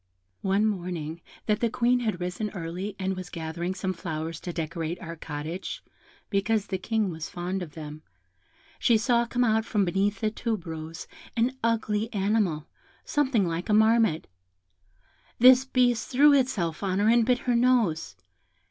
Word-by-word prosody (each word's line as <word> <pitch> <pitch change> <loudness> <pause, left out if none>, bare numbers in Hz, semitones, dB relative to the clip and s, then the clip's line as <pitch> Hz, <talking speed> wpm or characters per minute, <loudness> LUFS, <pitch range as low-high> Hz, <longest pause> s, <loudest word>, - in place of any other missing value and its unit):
One 195 +2 +2
morning 175 -5 -3 0.2
that 210 -1 +1
the 235 - +1
Queen 245 +2 +2
had 215 -7 -2
risen 180 +4 -3
early, 180 +4 -4
and 190 0 -2
was 185 -1 -7
gathering 170 +2 -4
some 190 -1 -2
flowers 165 -1 -5
to 175 - -5
decorate 165 +1 -3
our 170 -2 -7
cottage, 160 +3 -6 0.5
because 205 +1 +1
the 190 - -3
King 215 0 0
was 160 -1 -6
fond 180 +2 -3
of 160 -5 -8
them, 155 -1 -8 0.8
she 235 - +4
saw 235 +1 +2
come 245 +1 +1
out 220 -1 +2
from 210 -3 +1
beneath 195 +3 0
a 215 - +2
tube 220 -4 -3
rose 160 0 -6 0.3
an 245 +3 +2
ugly 225 -1 0
animal, 195 -6 +1 0.4
something 260 -10 +1
like 170 +3 -3
a 210 - +4
marmot. 220 -6 +4 1.1
This 255 +2 +7
beast 245 -3 +2
threw 285 +3 +6
itself 205 - +1
on 190 -2 0
her, 205 +2 +2
and 235 +1 +5
bit 250 +2 +3
her 245 -1 +2
nose. 235 - +2
195 Hz, 160 wpm, -27 LUFS, 170-230 Hz, 1.1 s, This